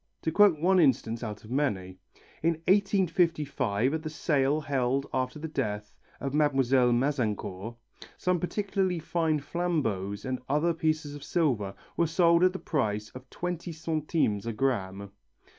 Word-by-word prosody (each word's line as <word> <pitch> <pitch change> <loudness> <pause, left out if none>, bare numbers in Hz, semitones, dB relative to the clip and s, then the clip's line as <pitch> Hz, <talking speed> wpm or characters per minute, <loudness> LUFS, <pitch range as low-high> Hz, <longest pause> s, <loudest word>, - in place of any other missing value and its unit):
To 160 - 0
quote 195 -3 +5
one 185 +3 +4
instance 120 -6 +2
out 105 -2 -6
of 110 - -12
many. 95 -10 -1 0.4
In 165 +1 +3
1855, 165 - +2
at 160 - -1
the 155 - -5
sale 145 -1 +1
held 135 -2 0
after 130 +1 -1
the 160 +2 -5
death 105 -8 -3 0.3
of 135 0 -3
Mlle. 135 -4 +3
Mazencourt, 120 -5 -1 0.4
some 180 -1 +1
particularly 190 0 -1
fine 160 -1 0
flambeaux 140 - -1
and 130 -1 -3
other 150 +4 +2
pieces 155 -2 -1
of 145 -1 -9
silver 120 - 0 0.2
were 170 - +3
sold 170 +1 +4
at 185 0 +4
the - - -3
price 105 - -1
of 130 0 -12
20 175 0 -4
centimes 155 - -1
a 115 - -2
gramme. 100 -5 -2
145 Hz, 145 wpm, -28 LUFS, 120-165 Hz, 0.4 s, quote